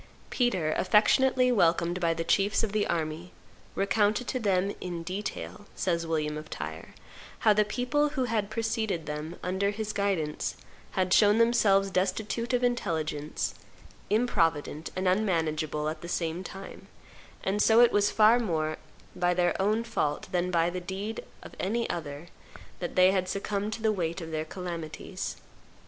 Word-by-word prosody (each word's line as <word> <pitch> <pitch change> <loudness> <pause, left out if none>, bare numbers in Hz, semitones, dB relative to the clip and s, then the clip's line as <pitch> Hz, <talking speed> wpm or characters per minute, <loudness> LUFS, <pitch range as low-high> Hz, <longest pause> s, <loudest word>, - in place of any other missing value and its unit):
Peter, 190 - +1
affectionately 250 +5 +4
welcomed 175 -4 +2
by 170 -2 +2
the 165 0 -2
chiefs 200 +6 +2
of 220 - -1
the 210 0 +1
army, 165 +1 -3 0.4
recounted 210 +4 +1
to 255 - -1
them 200 -2 +1
"in 175 -2 -4
detail," 205 +3 -5
says 170 -2 -1
William 150 -2 -1
of 155 0 -11
Tyre, - - -7 0.5
"how 215 - +6
the 210 +1 +4
people, 250 +7 0
who 280 -3 -1
had 220 -4 -1
preceded 220 -6 -1
them 150 +3 -5
under 190 +2 0
his 215 +1 -3
guidance, 185 -7 -1 0.4
had 185 -1 +1
shown 210 0 +6
themselves 210 -4 +4
destitute 205 +6 -1
of 250 0 +1
intelligence, 155 -11 -1 0.6
improvident, 165 -9 +1
and 185 0 -1
unmanageable 160 -6 0
at 155 0 -4
the 170 - -7
same 170 +1 -2
time; 195 +2 -9 0.6
and 200 +2 0
so 225 +1 +5
it 240 -1 +7
was 205 0 +3
far 220 +3 +5
more 155 -8 -1 0.4
by 180 0 +1
their 175 0 +2
own 215 +3 +2
fault 190 -10 -2
than 180 0 0
by 170 -1 +2
the 180 0 -4
deed 195 +5 -5 0.2
of - - -11
any 230 +5 0
other 155 0 -6 0.5
that 175 - -4
they 185 0 +6
had 185 -1 0
succumbed 200 +2 -2
to 220 +1 -6
the 220 - +4
weight 170 -3 -2
of 165 -2 -7
their 155 0 -2
calamities." 175 +1 -6
190 Hz, 160 wpm, -28 LUFS, 165-215 Hz, 0.6 s, it